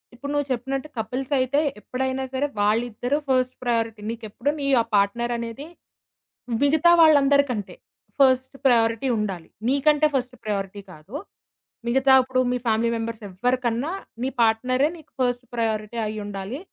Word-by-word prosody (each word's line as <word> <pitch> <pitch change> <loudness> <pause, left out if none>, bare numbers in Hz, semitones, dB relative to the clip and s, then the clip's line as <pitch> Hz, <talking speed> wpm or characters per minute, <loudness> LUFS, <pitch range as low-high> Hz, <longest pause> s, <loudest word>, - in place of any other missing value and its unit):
ఇప్పుడు 280 +4 -6
నువ్వు 290 -1 0
చెప్పినట్టు 265 +3 -2
కపిల్స్ 250 +5 -3
అయితే 260 +3 +2 0.2
ఎప్పుడైనా 260 +3 -2
సరే 270 +2 0
వాళ్ళిద్దరూ 235 +5 +1
ఫస్ట్ 255 -1 +2
ప్రయారిటీ. 230 -3 -1
నీకెప్పుడు 230 +3 -4
నీ 280 - -1
ఆ - - -1
పార్ట్నర్ 235 +4 +1
అనేది 235 +4 -6 1.0
మిగతా 315 +4 +5
వాళ్ళందరికంటే 280 - +4 0.4
ఫస్ట్ 260 0 +3
ప్రయారిటీ 230 0 +3
ఉండాలి. 195 -6 -3 0.2
నీకంటే 295 +2 +3
ఫస్ట్ 250 -1 -2
ప్రయారిటీ 200 -1 -3
కాదు. 165 - -12 0.7
మిగతా 265 +2 +4
ఇప్పుడు 255 0 -1
మీ 250 - +1
ఫ్యామిలీ 225 +1 +2
మెంబర్స్ 225 -1 -5
ఎవరికన్నా 245 - -1 0.3
నీ 260 - 0
పార్ట్నరే 255 +5 +2
నీకు 315 - -17
ఫస్ట్ 245 0 0
ప్రయారిటీ 220 -1 -2
అయి 215 0 -4
ఉండాలి. 200 +5 -5
245 Hz, 135 wpm, -24 LUFS, 220-265 Hz, 1.0 s, మిగతా